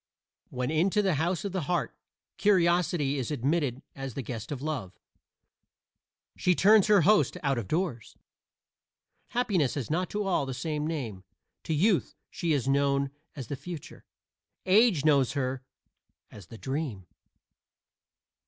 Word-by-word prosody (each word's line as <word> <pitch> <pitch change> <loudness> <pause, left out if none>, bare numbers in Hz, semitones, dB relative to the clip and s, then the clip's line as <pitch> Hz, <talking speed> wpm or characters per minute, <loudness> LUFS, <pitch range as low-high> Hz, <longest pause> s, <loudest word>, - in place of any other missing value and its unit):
When 125 +2 -3
into 190 +6 +2
the 190 -2 +2
house 170 +6 -1
of 200 - -2
the 180 -6 -3
heart 175 - -1 0.4
Curiosity 175 -7 +2
is 125 - -3
admitted 140 -1 -1
as 135 -3 -6
the 135 - -4
guest 115 +1 -6
of 140 - -3
Love 130 -11 -4 1.4
she 180 - +2
turns 210 +2 +5
her 205 -3 +6
host 205 +1 +3
out 135 -3 +1
of 105 - -6
doors. 155 - -2 1.1
Happiness 195 - 0
has 140 -2 -4
not 180 +3 0
to 210 0 -2
all 180 -8 0
the 130 - -4
same 150 +2 -2
name: 120 - -4 0.4
to 160 - 0
Youth 190 +4 +2 0.2
she 170 - -2
is 140 -4 +1
known 140 0 +2 0.2
as 135 -4 -6
the 140 - -4
Future; 165 +2 -9 0.6
Age 190 - +4
knows 140 -5 +4
her 130 -2 -2 0.7
as 100 -5 -12
the 115 - -11
Dream. 130 - -4
150 Hz, 145 wpm, -28 LUFS, 135-180 Hz, 1.4 s, her